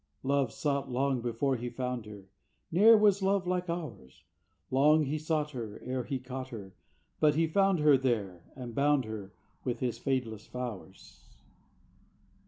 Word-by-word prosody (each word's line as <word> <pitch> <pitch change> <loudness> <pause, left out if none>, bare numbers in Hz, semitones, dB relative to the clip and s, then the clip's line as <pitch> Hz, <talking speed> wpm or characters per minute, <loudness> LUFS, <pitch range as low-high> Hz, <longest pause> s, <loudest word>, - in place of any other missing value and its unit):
"Love 135 -3 +1
sought 140 0 -1
long 130 0 0
before 120 +3 0
he 120 0 -4
found 125 -3 -4
her, 105 -2 -10 0.5
Ne'er 220 +6 +7
was 205 -2 +4
love 195 0 +1
like 180 0 -1
ours! 130 - -6 0.5
Long 150 +4 +5
he 150 +3 -2
sought 155 -1 -1
her, 115 -6 -6
E'er 125 0 -2
he 135 - -2
caught 130 +1 -6
her. 100 -6 -9 0.5
But 150 -1 +4
he 165 +1 +3
found 195 +3 +3
her 150 -3 +6
There, 105 -9 -1
and 125 -3 -7
bound 140 0 +2
her 105 -3 -7 0.3
With 125 -2 -2
his 120 -3 -2
fadeless 120 -5 -2
flowers." 115 -6 -8
130 Hz, 155 wpm, -30 LUFS, 120-150 Hz, 0.5 s, Ne'er